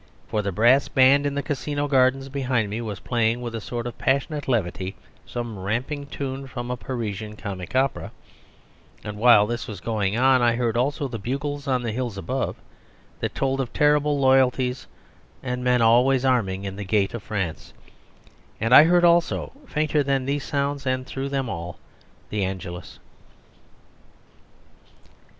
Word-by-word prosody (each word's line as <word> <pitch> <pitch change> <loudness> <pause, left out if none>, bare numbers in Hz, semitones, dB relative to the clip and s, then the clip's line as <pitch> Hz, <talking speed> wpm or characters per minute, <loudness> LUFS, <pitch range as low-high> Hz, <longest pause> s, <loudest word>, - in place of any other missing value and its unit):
For 110 -1 0
the 100 -1 -2
brass 120 +8 +4
band 140 +2 +4
in 140 - -3
the 145 - -1
Casino 145 +1 -2
gardens 135 0 +2
behind 130 -6 -1
me 110 +3 -3
was 105 -5 -5
playing 115 +3 0
with 120 -1 -5
a 115 - -4
sort 120 +2 -5
of 120 - -6
passionate 140 +2 0
levity 95 -6 -1 0.3
some 120 -4 -5
ramping 130 +9 -3
tune 135 -1 -5
from 120 -1 -5
a - - -1
Parisian 110 -4 -5
comic 95 -1 -7
opera, 135 0 0 0.9
and 105 0 -6
while 115 -3 +7
this 120 +2 -4
was 105 - -7
going 105 -2 -1
on 130 0 +4
I 120 -1 +3
heard 120 -2 0
also 140 +3 0
the 120 -3 -6
bugles 140 +5 -4
on 130 -2 +1
the 115 - -2
hills 120 -2 -3
above, 130 +7 -2 0.6
that - - -3
told 135 0 0
of 125 - -4
terrible 150 0 +3
loyalties 130 -1 +2 0.6
and 125 -1 -3
men 125 -1 +3
always 125 +3 +4
arming 100 -7 +1
in 95 -1 -5
the 105 - -4
gate 100 0 +1
of 115 - -5
France; 95 -6 -4 0.9
and 115 +3 +1
I 145 - +10
heard 175 +1 +4
also, 170 0 +2 0.2
fainter 155 -3 +1
than 135 -2 0
these 140 +1 -1
sounds 140 -1 -2
and 130 0 0
through 135 +1 -4
them 135 -2 -1
all, 85 -4 -6 0.5
the 105 -2 -1
Angelus. 90 -2 -6
125 Hz, 165 wpm, -24 LUFS, 110-135 Hz, 0.9 s, I